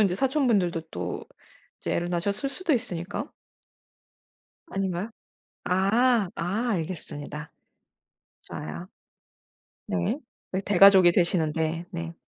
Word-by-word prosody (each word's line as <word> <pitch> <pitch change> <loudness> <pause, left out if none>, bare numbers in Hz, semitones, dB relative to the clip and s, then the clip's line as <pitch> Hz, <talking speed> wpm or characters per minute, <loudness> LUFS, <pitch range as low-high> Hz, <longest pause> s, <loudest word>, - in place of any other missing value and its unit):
이제 195 -4 +3
사촌분들도 230 - +2
또 - - -4 0.6
이제 - - -2
애를 175 0 -1
낳으셨을 200 +10 -1
수도 345 +2 0
있으니까. 185 -6 -3 1.4
아닌가요? 195 - -2 0.5
아. 205 +3 +3
아 205 +8 -1
알겠습니다. 155 -4 -5 0.9
좋아요. 80 +4 -7 1.0
네. 90 -1 0 0.3
그 190 - -1
대가족이 195 -2 +7
되시는데. 165 -1 +1
네. 170 -2 -5
180 Hz, 230 characters per minute, -27 LUFS, 165-205 Hz, 1.4 s, 대가족이